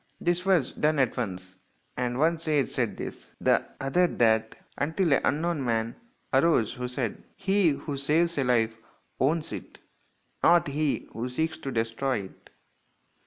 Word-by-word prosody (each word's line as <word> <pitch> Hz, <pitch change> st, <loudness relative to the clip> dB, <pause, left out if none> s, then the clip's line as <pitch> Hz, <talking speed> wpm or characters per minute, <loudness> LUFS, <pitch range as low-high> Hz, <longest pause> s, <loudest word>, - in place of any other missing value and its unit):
This 175 Hz, +2 st, 0 dB
was 175 Hz, -9 st, +3 dB
done 150 Hz, 0 st, +1 dB
at 130 Hz, -4 st, +2 dB
once, 95 Hz, -6 st, -5 dB, 0.4 s
and 125 Hz, 0 st, -1 dB
one 160 Hz, +3 st, +2 dB
sage 155 Hz, -4 st, +1 dB
said -, -, -1 dB
this, -, -, -7 dB
the -, -, +3 dB, 0.2 s
other 175 Hz, +7 st, +2 dB
that, 110 Hz, -5 st, +2 dB, 0.2 s
until 160 Hz, +1 st, +1 dB
an -, -, +3 dB
unknown 155 Hz, +1 st, 0 dB
man 115 Hz, -1 st, -1 dB, 0.4 s
arose 135 Hz, -5 st, +3 dB
who 125 Hz, 0 st, -4 dB
said, 125 Hz, -3 st, -3 dB
" -, -, -35 dB
He 195 Hz, -2 st, +2 dB
who 145 Hz, 0 st, -3 dB
saves 165 Hz, +5 st, +2 dB
a -, -, +2 dB
life 115 Hz, -3 st, +2 dB, 0.4 s
owns 155 Hz, +5 st, +1 dB
it, -, -, -8 dB, 0.6 s
not 170 Hz, -3 st, +5 dB
he 150 Hz, 0 st, -1 dB
who 120 Hz, +3 st, -3 dB
seeks 160 Hz, +6 st, -2 dB
to 135 Hz, -, -5 dB
destroy 115 Hz, +1 st, -1 dB
it. 95 Hz, -, -14 dB
140 Hz, 160 wpm, -27 LUFS, 120-165 Hz, 0.6 s, not